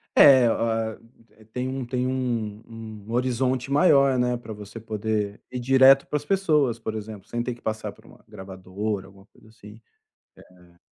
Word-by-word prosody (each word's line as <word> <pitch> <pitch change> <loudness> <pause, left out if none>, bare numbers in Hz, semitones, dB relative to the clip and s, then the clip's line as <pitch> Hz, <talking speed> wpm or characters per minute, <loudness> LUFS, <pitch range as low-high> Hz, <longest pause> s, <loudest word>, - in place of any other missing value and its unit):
É, 130 -4 +8
o - - +2
a 115 -1 -1 0.6
tem 125 +1 -2
um 130 -1 -4
tem 125 +1 -2
um 120 -5 -2 0.5
um - - -8
horizonte 125 +1 0
maior, 140 -3 +4
né, 125 0 +1
para 110 -2 -9
você 105 +2 -10
poder 110 -2 -3
ir 125 - -4
direto 135 +2 +6
para 150 - -1
as 145 - -8
pessoas, 150 - +2
por 110 -1 -5
exemplo, 105 -2 -8
sem 120 - -3
ter 120 0 -3
que 120 - -21
passar 110 0 -3
por - - -22
uma - - -17
gravadora, 95 +1 -5
alguma 95 0 -18
coisa, - - -23
assim. 110 0 -15 0.8
É. 85 0 -24
120 Hz, 175 wpm, -25 LUFS, 105-130 Hz, 0.8 s, É